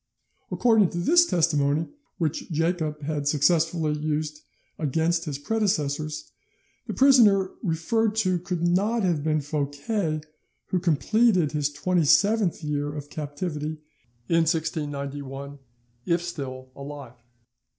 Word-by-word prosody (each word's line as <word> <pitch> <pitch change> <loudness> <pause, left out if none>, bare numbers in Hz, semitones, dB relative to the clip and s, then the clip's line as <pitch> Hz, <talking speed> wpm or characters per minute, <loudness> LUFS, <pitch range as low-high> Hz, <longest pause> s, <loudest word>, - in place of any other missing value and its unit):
According 220 -6 +3
to - - -6
this 340 - +4
testimony, 155 - +1 0.3
which 160 -4 -2
Jacob 160 -2 -1
had 145 -1 -2
successfully 160 +1 +2
used 150 0 -3 0.4
against 160 +3 0
his 145 -4 -3
predecessors, 155 -5 -1 0.6
the - - -3
prisoner 220 -9 +5
referred 215 +5 0
to 185 -5 +1
could 180 -1 -3
not 200 +6 +2
have 170 -6 +1
been 155 -1 +1
Fouquet, 150 +4 -2 0.5
who 185 - +1
completed 180 +1 +2
his 150 -2 0
twenty 170 +3 0
seventh 205 +1 +3
year 145 -1 -2
of 145 -1 -8
captivity 150 +1 -4 0.5
in 165 - +2
1691, 145 -3 -3 0.5
if 170 0 +1
still 130 -6 -6
alive. 140 -4 -9
155 Hz, 115 wpm, -25 LUFS, 145-180 Hz, 0.6 s, prisoner